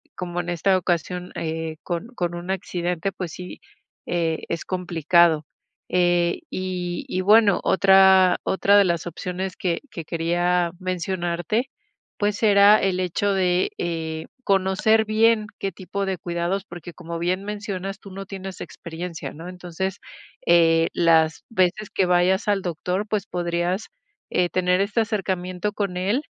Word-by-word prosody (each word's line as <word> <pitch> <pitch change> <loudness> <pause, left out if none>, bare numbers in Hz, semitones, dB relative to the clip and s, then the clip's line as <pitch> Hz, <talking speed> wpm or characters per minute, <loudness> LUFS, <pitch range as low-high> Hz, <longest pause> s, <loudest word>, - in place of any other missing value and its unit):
como 175 -1 -4
en 175 - -7
esta 180 +3 +2
ocasión, 180 0 -2
eh, 160 0 -4
con 175 +5 -3
con 175 -3 -2
un 175 +2 -4
accidente, 180 -1 -2
pues 180 -3 -5
sí, 180 0 -9 0.5
eh, 165 -2 0
es 170 - -3
complicado. 170 -3 +2 0.4
Eh, 175 -1 +2
y 180 -1 -3
y 185 - -1
bueno, 210 +1 +5
otra 190 -1 +6
otra 200 +1 +3
de 200 - +6
las 170 -1 0
opciones 180 +2 -4
que 175 -3 -1
que 165 - -6
quería 175 +1 +1
mencionarte, 185 - -2 0.5
pues, 205 +1 -1
era 205 0 +7
el 185 -1 +1
hecho 190 +3 0
de, 180 -1 +1
eh, 160 -2 -3 0.2
conocer 195 +3 +3
bien 215 0 +3
qué 195 - -2
tipo 195 +1 -4
de 190 -2 -1
cuidados, 175 +3 -2
porque, 175 0 -9
como 170 -1 -6
bien 185 +3 -1
mencionas, 200 -1 -5
tú 200 - -12
no 195 +1 -7
tienes 190 -1 -7
experiencia, 170 0 -7
¿no? 165 +3 -9
Entonces, 180 +1 -5 0.5
eh, 165 -1 +5
las 160 -2 +3
veces 195 0 +1
que 195 - +1
que - - +3
vayas 180 +3 +2
al 200 -2 +2
doctor, 180 +4 -2
pues, 205 -3 -2
podrías, 175 +2 -1 0.4
eh, 175 -1 +2
tener 180 +1 +2
este, 210 +3 +1
acercamiento 190 -2 -2
con 200 -4 -2
él 205 +11 0
180 Hz, 150 wpm, -23 LUFS, 175-195 Hz, 0.5 s, era